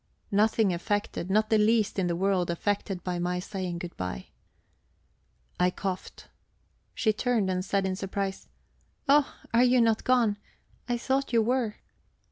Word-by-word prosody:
Nothing 210 -1 +3
affected, 205 0 -2
not 215 +2 +2
the 220 - +5
least 220 -1 +2
in 185 - +1
the 170 - 0
world 185 -1 +1
affected 195 +1 -2
by 180 -1 -2
my 180 +1 -1
saying 180 -1 -4
good 175 0 -7
bye. 90 -10 -5 1.3
I 180 - +4
coughed. 185 0 -5 0.7
She 215 -3 +2
turned 220 -4 0
and 185 0 -1
said 195 0 0
in 190 -1 -1
surprise: 195 0 -4 0.6
"Oh, 285 0 +4 0.2
are 235 +1 +5
you 250 0 +4
not 225 -2 +3
gone? 235 -5 +3 0.5
I 240 - +1
thought 265 +3 -1
you 230 -1 +4
were." 235 -2 0
200 Hz, 150 wpm, -28 LUFS, 185-225 Hz, 1.3 s, the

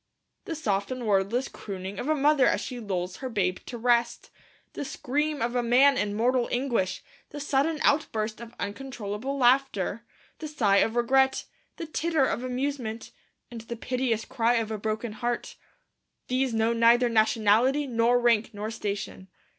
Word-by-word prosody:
The 330 - -4
soft 205 -10 -1
and 255 -2 -4
wordless 210 +5 +1
crooning 190 -1 -7
of 280 - -3
a 310 - +3
mother 290 -1 +4
as - - +2
she 250 - -6
lulls 185 -4 -3
her 260 - -5
babe 185 -5 0
to 240 - -6
rest; 235 0 +1 0.4
the - - -4
scream 290 +1 -2
of 240 +1 -2
a 245 - +2
man 255 +4 +5
in 205 -4 -1
mortal 245 +2 +1
anguish; 245 -7 -1 0.3
the 290 - -8
sudden 290 +2 0
outburst 225 -6 0
of 235 0 -10
uncontrollable 235 +2 -4
laughter; 245 -5 +2 0.4
the 315 - -5
sigh 220 -10 +2
of 225 +3 +2
regret; 265 +2 +2 0.3
the 330 - -5
titter 315 -2 +1
of 245 - -2
amusement; 255 -3 -3 0.4
and 235 -1 -7
the 235 +1 -7
piteous 245 -1 -1
cry 245 -2 +1
of 225 -2 -1
a 215 - -3
broken 220 +2 -3
heart, 240 +3 -3 0.7
these 255 0 +1
know 225 +1 +1
neither 235 +1 +4
nationality 230 +5 +3
nor 240 -1 +2
rank 230 -2 +2
nor 210 +2 -4
station. 200 -3 -5
240 Hz, 160 wpm, -27 LUFS, 220-265 Hz, 0.7 s, man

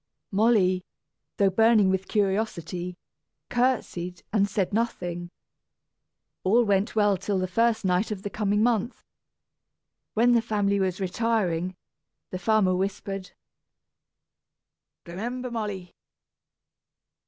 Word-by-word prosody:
Molly, 195 -3 +3 0.5
though 195 -1 +3
burning 220 -1 +4
with 190 0 -1
curiosity, 185 -4 -1 0.5
courtesied, 220 -8 -1
and 200 -2 +3
said 195 -1 -1
nothing. 175 -6 -2 1.1
All 225 +6 +4
went 200 -1 +1
well 205 -2 +3
till 195 +2 -2
the 185 0 0
first 230 +3 +1
night 185 +3 +1
of 200 -3 -5
the 205 - -4
coming 210 0 +1
month. 235 0 0 1.1
"When 235 +3 +4
the 235 -1 +4
family 205 -3 0
was 185 -1 -1
retiring, 185 -3 0 0.6
the 185 - -4
farmer 195 -1 +3
whispered: 195 0 -3 1.7
"Remember, 240 +8 -5
Molly! 205 -6 -4
200 Hz, 105 wpm, -26 LUFS, 185-225 Hz, 1.7 s, burning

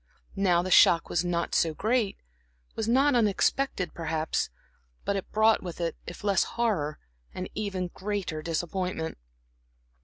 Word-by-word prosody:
Now 180 -3 +3
the 185 - -4
shock 170 -1 +6
was 175 - +1
not 170 -1 -1
so 160 -2 +2
great, 220 0 0 0.6
was 220 - -2
not 275 +4 +4
unexpected, 215 - +1
perhaps; 160 -1 -1 0.6
but 200 - 0
it 195 - -4
brought 220 +1 +4
with 175 -2 -7
it, 170 -1 -1
if 175 - -8
less 200 -3 +3
horror, 185 -11 0 0.4
an 185 0 -4
even 195 -4 -3
greater 190 -6 -3
disappointment. 170 - -3
185 Hz, 140 wpm, -28 LUFS, 170-210 Hz, 0.6 s, shock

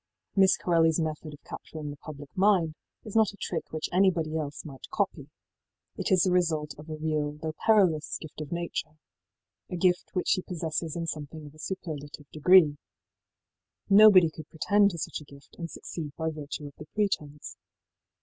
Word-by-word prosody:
Miss 190 -1 +5
Corelliís 165 -2 +3
method 155 -1 -3
of 145 - -13
capturing 150 -2 -7
the 145 - -9
public 145 -2 -10
mind 185 -5 +3 0.3
is 215 - -8
not 220 -2 +4
a - - -15
trick 165 -5 -4
which 155 0 -2
anybody 175 -4 +2
else 150 -2 -4
might 135 -4 -10
copy. 185 -8 -2 0.7
It - - -3
is 185 -2 +5
the 185 - +2
result 160 -4 +1
of 155 +2 -11
a 155 - -3
real, 155 -1 -1
though 155 +1 -5
perilous, 185 -9 +3
gift 155 -1 -9
of 150 - -7
nature 170 -2 -4 0.7
a - - -4
gift 180 0 +2
which 180 - 0
she 185 - +3
possesses 165 -3 -3
in 170 -1 -2
something 155 -1 -6
of 145 - -12
a 155 - -18
superlative 150 -5 -6
degree. 155 -1 +6 1.1
Nobody 195 -5 +8
could 155 -1 -11
pretend 200 +5 +3
to 170 - -6
such 155 - -4
a - - -10
gift 140 -1 -17
and 170 -1 -4
succeed 155 -3 -7
by 160 -1 -1
virtue 150 -1 -6
of 145 - -9
the 150 - -9
pretence. 150 -9 -2
160 Hz, 180 wpm, -28 LUFS, 150-180 Hz, 1.1 s, Nobody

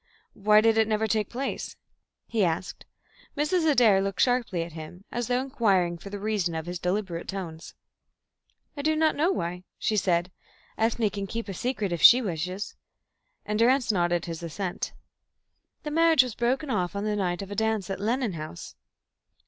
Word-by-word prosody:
Why 210 +1 +4
did 225 0 +3
it 220 - +3
never 220 0 +1
take 215 -1 0
place?" 265 +3 -4 0.5
he 220 -3 0
asked. 170 +1 -2 0.5
Mrs. 320 +2 +2
Adair 230 -9 +5
looked 195 0 -3
sharply 245 -9 +2
at 170 - -8
him, 160 +4 -10
as 240 -1 -2
though 245 0 +1
inquiring 195 -10 +1
for 200 - -9
the 205 - -5
reason 200 -5 -1
of 160 0 -3
his 175 0 -5
deliberate 180 -1 -2
tones. 170 -5 -6 1.0
"I 285 - -4
don't 310 +1 +1 0.2
know 325 +6 +2
why," 180 - -3
she 215 - 0
said. 180 -2 +1 0.4
"Ethne 225 -1 +1
can 200 -1 -4
keep 230 +3 -4
a 195 - -4
secret 215 -1 -2
if 170 - -2
she 245 - +9
wishes," 185 -2 -4 0.7
and 210 0 -1
Durrance 250 +1 +4
nodded 175 -3 +1
his 165 -1 -6
assent. 175 +2 -4 0.9
"The 300 - -4
marriage 325 -3 +5
was 250 -3 -5
broken 260 +5 0
off 180 -4 -1
on 200 - -2
the 210 0 0
night 180 -2 -1
of 195 - -10
a - - -4
dance 220 -2 0
at 190 - -3
Lennon 230 +1 0
House." 155 - -7
205 Hz, 175 wpm, -27 LUFS, 180-235 Hz, 1.0 s, she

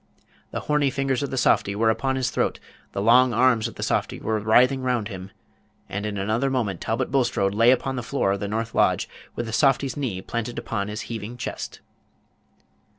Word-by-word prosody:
The - - -4
horny 150 -2 +2
fingers 135 -1 -1
of 140 - -2
the 130 - -4
softy 100 -4 +2
were 110 +1 +3
upon 135 +4 -1
his 130 -2 -1
throat, - - 0 0.3
the 100 - -3
long 120 +2 +5
arms 120 -2 +3
of 115 - -10
the - - -5
softy - - -1
were 110 0 -1
writhing 125 +5 +4
round 125 -4 -1
him, 95 -2 -7 0.6
and 100 +2 -3
in 105 -1 -4
another 110 +7 0
moment 110 -9 -1
Talbot 120 +4 -1
Bulstrode 120 -7 +1
lay 115 +3 +5
upon 130 +1 +2
the - - -1
floor 115 -4 0
of 100 - -1
the 100 - -3
north 110 +2 -3
lodge, - - +2 0.3
with 120 - -3
the 110 - -6
softy's 135 0 +2
knee 125 -10 -2
planted 115 +4 -4
upon 100 -3 -3
his 105 +1 -4
heaving 115 +1 -6
chest. - - -6
115 Hz, 200 wpm, -24 LUFS, 105-130 Hz, 0.6 s, long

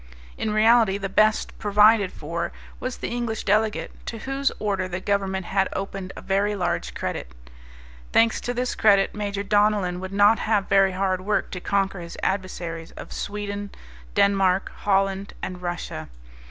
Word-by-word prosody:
In - - -2
reality 215 -1 +4
the 195 -1 -4
best 215 +3 +2
provided 210 -1 +5
for 170 +3 -4 0.3
was 255 0 -4
the - - -4
English 235 -2 -2
delegate, 215 +2 +1 0.2
to 230 - -4
whose 270 +4 -1
order 195 -3 -1
the 180 0 -4
Government 190 -1 -1
had 195 +1 +1
opened 195 -1 -4
a - - -8
very 200 +2 +1
large 175 - -2
credit. - - -4 0.8
Thanks 230 0 +3
to 245 - -2
this 250 +1 -1
credit 200 -2 +4
Major 200 -1 -3
Donellan 205 -3 +2
would 190 +1 -6
not 205 +2 +5
have 210 -3 +1
very 195 -1 +4
hard 185 0 0
work 205 +2 -1
to 180 - -4
conquer 195 0 0
his 170 -1 -8
adversaries 175 -4 -3
of - - -9
Sweden, 205 0 -4 0.5
Denmark 195 -1 +3
Holland, 195 0 0
and 180 -1 -5
Russia. 175 0 -5
200 Hz, 155 wpm, -24 LUFS, 190-210 Hz, 0.8 s, provided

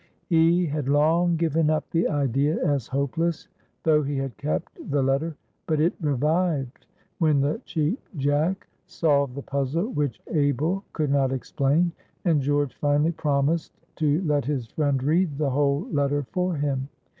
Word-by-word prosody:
He 170 +1 +3
had 145 -3 -2
long 165 +4 +3
given 160 -1 +1
up 155 0 0
the 165 0 +2
idea 140 +1 +1
as 140 -5 0
hopeless, 145 +5 -1 0.4
though 155 -1 +4
he 145 -1 -2
had 135 -2 -3
kept 155 +3 -3
the 140 -1 +1
letter, 140 +4 0 0.3
but 155 -2 +1
it 165 +3 +3
revived 150 -1 0 0.3
when 155 -4 +3
the 145 - 0
Cheap 160 - -1 0.2
Jack 145 +7 0 0.2
solved 140 -5 +1
the 140 - -6
puzzle 140 - -1
which 145 - -2
Abel 155 +6 +1
could 150 -3 -1
not 135 -2 +2
explain, 140 +5 +1 0.3
and 160 -5 +3
George 145 0 0
finally 145 +2 +2
promised 150 +1 0 0.2
to 155 +3 +1
let 150 -5 +1
his 135 -4 -2
friend 140 +2 -1
read 155 0 +1
the 145 -2 0
whole 140 +1 +1
letter 145 -1 +1
for 180 -1 0
him. 140 -2 -2
145 Hz, 155 wpm, -25 LUFS, 140-160 Hz, 0.4 s, though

